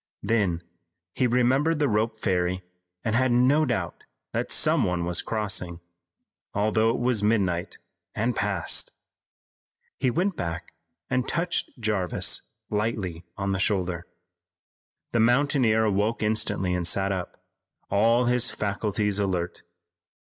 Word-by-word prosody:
Then 100 -6 +1 0.5
he 130 - +2
remembered 130 +6 +2
the 150 -1 +2
rope 110 0 0
ferry 90 -2 0 0.4
and 110 - 0
he 125 - +3
had 130 -1 +2
no 130 +6 +4
doubt 120 -2 -3 0.3
that - - -2
some - - +4
one 90 -1 0
was 85 0 +1
crossing, 95 -6 -2 0.8
although 110 +2 +2
it 115 - 0
was 120 -3 +1
midnight 95 -5 0 0.4
and 115 +2 0
past. 100 -6 +1 1.1
He 130 - +2
went 180 +9 0
back 85 - -5 0.3
and 125 0 0
touched 170 -5 -2
Jarvis 105 -6 +1 0.3
lightly 105 -6 -2
on 100 0 -1
the 95 - -1
shoulder. 90 -4 -1 1.0
The 115 - +1
mountaineer 120 -2 +3
awoke 105 +2 0
instantly 105 -3 +1
and 90 -2 0
sat 95 +2 +2
up, 95 -2 -4 0.5
all 115 +4 +3
his 125 0 +3
faculties 105 0 -1
alert. 90 -3 -2
105 Hz, 125 wpm, -26 LUFS, 95-120 Hz, 1.1 s, no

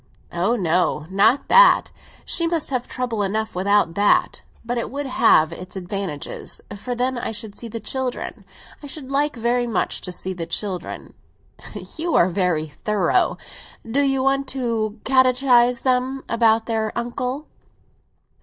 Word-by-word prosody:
"Ah 190 +8 +1
no, 175 -5 +1
not 210 +8 +3
that; - - +6 0.3
she 335 - +1
must 330 -4 -1
have 250 -2 -2
trouble 245 -4 -3
enough 215 +2 -1
without 195 -2 +2
that. 205 +3 +2 0.2
But 240 +1 -1
it - - -3
would 285 +2 -4
have 165 -10 +4
its 180 +3 -9
advantages, 185 -5 -5 0.2
for 245 +5 -5
then 250 +1 -1
I - - -3
should 215 -2 -7
see 235 - -7
the 230 +1 -6
children. 255 +3 -4 0.4
I 290 - -8
should 275 -1 -7
like 290 +1 +1
very 240 +1 0
much 230 - -1
to 180 - -5
see 185 +1 -4
the 170 -2 -5
children." 190 -5 -4 0.8
"You 330 +1 -1
are 175 - +5
very 180 -4 0
thorough. 210 - 0 0.5
Do 260 +5 +1
you 270 -2 +1
want 275 0 +1
to 225 -3 -2
catechise 255 -2 +4
them 260 +1 0
about 225 -1 +3
their 220 -2 -1
uncle!" 250 +4 -3
235 Hz, 150 wpm, -22 LUFS, 200-260 Hz, 0.8 s, that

